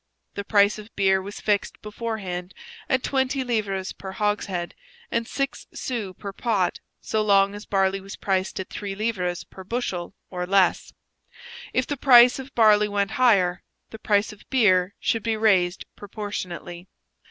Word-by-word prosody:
The 200 - -4
price 205 0 +3
of 215 +1 -13
beer 190 -1 +3
was 200 +2 -8
fixed 205 -2 -1
beforehand 205 -5 -5 0.3
at 260 -1 +1
twenty 265 0 0
livres 205 -6 -2
per 190 -1 -8
hogshead 200 -4 -2 0.4
and 230 0 -1
six 275 +1 -3
sous 215 -7 -4
per 200 -1 -7
pot 205 -5 0 0.2
so 220 - -1
long 200 -1 +4
as 205 +1 -9
barley 195 0 +1
was 195 +1 -9
priced 190 -1 -1
at 190 - -6
three 200 -1 -5
livres 190 -5 -2
per 190 - -12
bushel 190 -5 -3 0.2
or 180 -1 -3
less; 195 -1 +2 0.8
if 255 - +1
the 290 - -3
price 245 -1 +7
of 265 0 -10
barley 210 -2 +5
went 200 0 -1
higher, 185 -8 +4 0.3
the 220 - -9
price 205 0 +1
of 210 - -17
beer 195 -7 +3
should 225 - 0
be 225 0 -1
raised 190 -5 +2
proportionately. 185 -4 -6
205 Hz, 155 wpm, -24 LUFS, 190-225 Hz, 0.8 s, price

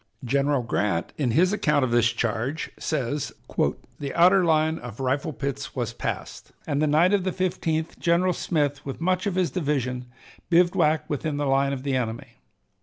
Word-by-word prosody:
General 140 +1 +1
Grant, 105 -7 -1
in 140 -5 0
his 180 - +3
account 150 -9 +2
of 120 - -3
this 120 -1 +4
charge, 120 +7 -2
says: 145 -2 -2 0.7
"The 140 -2 -5
outer 185 +3 +6
line 160 -1 +2
of 120 -1 -9
rifle 135 +4 0
pits 140 -2 -4
was - - -2
passed, - - -5
and 145 -1 -1
the 155 - +3
night 165 +6 +4
of 200 -2 +2
the 185 - 0
15th 165 -3 -2
General 180 +2 +2
Smith, 145 -5 -1
with 135 - -6
much 185 +3 0
of 195 - -1
his 185 -2 +1
division, 135 -7 -1 0.4
bivouacked 170 -3 +3
within 145 0 -2
the 145 - -1
line 135 0 +2
of 135 -2 -4
the 140 -2 0
enemy. 115 -2 -4
145 Hz, 175 wpm, -25 LUFS, 130-170 Hz, 0.7 s, outer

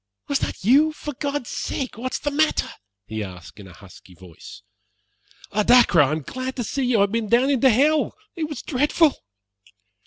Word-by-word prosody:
"Was 280 - 0
that - - -5
you? 290 +9 +4
For 295 -1 -7
God's 280 -1 -4
sake 260 -3 -4
what's 255 +3 -4
the 290 - -3
matter?" 310 +2 +1 0.3
he 110 -1 -5
asked 90 -1 -11
in 100 - -11
a 90 - -14
husky 90 0 -16
voice. 85 -2 -14 0.9
"Oh, 210 - +1
Dacre, 235 -7 +5
I 140 0 +2
am 155 -1 -3
glad 255 - -5
to 245 - -3
see 265 +4 -2
you! 245 -2 +2
I - - +3
have 200 0 +2
been 225 -2 -2
down 250 +5 +3
into 265 -1 +4
hell. 295 +6 +2 0.2
It 315 -3 -3
was 295 -5 -7
dreadful." 295 +3 +2
250 Hz, 190 wpm, -22 LUFS, -, 0.9 s, Dacre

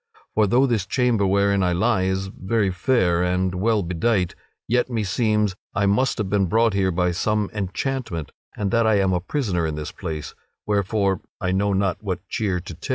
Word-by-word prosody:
For 110 -1 +3
though 125 +7 +4
this 110 -7 0
chamber 115 -4 +2
wherein 100 0 +2
I 90 -1 +2
lie 95 +1 +2
is 95 0 -1
very 95 +1 -1
fair 90 -3 +2
and 90 +1 0
well 105 +3 +1
bedight, 90 +2 0 0.3
yet 125 +2 +1
meseems 105 -2 +1 0.2
I 100 - +2
must 125 +7 +2
have 105 -4 -1
been 95 -1 +1
brought 115 +3 +3
here 95 -1 +2
by 90 0 +1
some 105 +3 0
enchantment, 100 - -3 0.3
and 100 -2 -1
that 115 -1 +3
I 110 - +4
am 95 -2 +2
a 90 - +1
prisoner 95 - -1
in 80 - -3
this 75 0 -5
place; 75 -2 -6 0.3
wherefore 100 -1 0 0.2
I 90 - -1
know 100 +2 +1
not 95 -2 0
what 95 -2 -4
cheer 95 -5 -1
to 85 -1 -8
take." 85 - -10
100 Hz, 190 wpm, -23 LUFS, 90-110 Hz, 0.3 s, though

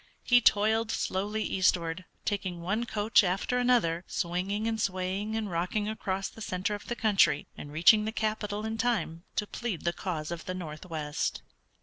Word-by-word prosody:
He 245 -1 +5
toiled 220 +1 +3
slowly 210 +1 -1
eastward, 180 -2 +1 0.2
taking 190 -4 -2
one 215 +6 -1
coach 210 0 +4
after 195 +7 0
another, 230 -10 +2
swinging 190 +5 -1
and 225 -1 -1
swaying 190 +3 -1
and 220 -1 -1
rocking 180 +5 -1
across 195 -3 -2
the 225 - -12
center 185 0 -2
of 205 - -6
the 240 - -2
country, 205 -10 +3
and 145 - -9
reaching 175 +8 +6
the 220 - -1
capital 215 -1 -2
in 220 0 -3
time 210 -8 0
to 210 - 0
plead 210 -5 -4
the 170 - +1
cause 165 -5 -4
of 170 -1 -5
the 185 - -3
northwest. 155 -3 -4
200 Hz, 165 wpm, -29 LUFS, 175-220 Hz, 0.2 s, reaching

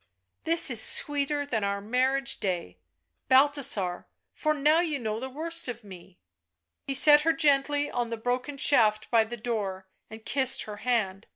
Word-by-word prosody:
" 95 - -54
This 330 -4 +4
is 230 -3 +2
sweeter 290 0 +2
than 225 -7 -3
our 200 0 -2
marriage 255 +5 -1
day, 175 - -4 0.5
Balthasar, 260 -9 +1 0.3
for 305 -1 -2
now 300 +3 +2
you 325 -4 -2
know 220 -3 -4
the 260 +2 -7
worst 330 +4 -2
of 240 -2 -7
me 185 -2 -14 0.4
" 85 0 -56
He 275 - -2
set 295 +2 +7
her 325 +2 +1
gently 290 -2 +1
on 240 -1 -3
the 230 - -5
broken 250 +5 -4
shaft 215 -7 +1
by 225 -2 +3
the 240 +2 -8
door 205 -5 -5 0.2
and 220 0 -13
kissed 265 -2 0
her 210 -1 -9
hand. 215 -5 -2
250 Hz, 175 wpm, -26 LUFS, 215-285 Hz, 0.5 s, set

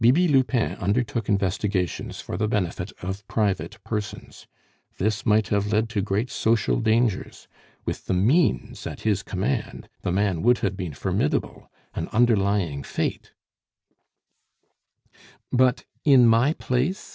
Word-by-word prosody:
Bibi 135 +10 +5
Lupin 130 -4 +2
undertook 110 +2 -1
investigations 95 -2 -1
for - - -6
the 105 +4 0
benefit 95 -4 -2
of 95 +2 -5
private 95 -7 -1
persons. 105 -3 -6 0.5
This 110 +2 -1
might 110 0 +3
have 105 0 0
led 110 +1 +1
to 110 -3 -1
great 105 +5 -1
social 115 0 +1
dangers. 110 -2 0 0.4
With - - -4
the 95 - +1
means 120 - +1
at - - -7
his 105 -3 +1
command, 110 +7 -3
the - - -1
man 95 -3 +1
would 120 +1 +4
have 100 -1 -1
been 90 -6 -5
formidable, - - -2 0.2
an - - -3
underlying 100 -9 +2
fate - - -3 1.5
" 125 - -7
"But 130 -1 +2 0.2
in 135 -4 +6
my 115 +6 +4
place?" 135 +8 -2
105 Hz, 135 wpm, -24 LUFS, 95-120 Hz, 1.5 s, in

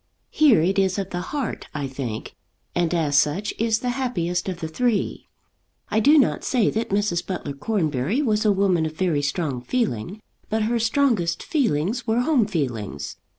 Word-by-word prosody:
Here 270 - +5
it 195 +3 +2
is 190 -1 +1
of 195 -1 -3
the 175 - -2
heart, 285 -5 -3
I 145 -2 -2
think, 130 -5 -5 0.4
and 175 -2 +1
as 150 -5 +3
such 185 +8 0
is 220 -1 +1
the 250 - 0
happiest 190 -9 -1
of 180 -2 -5
the 160 - -3
three. 230 +6 -1 0.6
I 215 - +3
do 290 +8 +6
not 275 - +2
say 240 -5 +2
that 225 +1 -2
Mrs. 200 -4 0
Butler 175 -6 -4
Cornbury 155 - -1
was 215 -4 +1
a 215 - +4
woman 190 -5 +2
of 155 - -7
very 160 -3 0
strong 145 -3 -2
feeling; 200 - -2 0.3
but 220 0 0
her 235 +2 +1
strongest 225 -7 +1
feelings 230 - 0
were 225 +2 +2
home 250 -6 +2
feelings. 120 - -3
195 Hz, 175 wpm, -23 LUFS, 155-230 Hz, 0.6 s, do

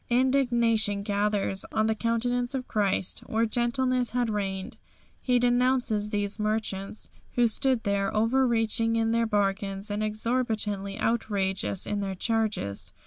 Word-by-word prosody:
Indignation 235 -5 +2
gathers 205 -1 0
on 215 - +1
the 220 - +2
countenance 245 +3 -1
of 255 -1 -4
Christ 200 -3 0
where 225 +1 +1
gentleness 245 +2 0
had 245 -2 0
reigned. 195 -2 -3 0.4
He 250 -1 +2
denounces 245 -3 +2
these 205 0 -2
merchants, 210 -2 -3 0.2
who 245 -1 +4
stood 250 +1 +1
there 200 -1 0
over 255 +4 +3
reaching 225 -1 +1
in 225 0 +1
their 230 0 +2
bargains 200 -1 -1
and 205 +1 -2
exorbitantly 215 -3 -1
outrageous 195 -4 -1
in 205 0 -2
their 195 -1 -3
charges. 185 - -2
220 Hz, 135 wpm, -27 LUFS, 200-240 Hz, 0.4 s, who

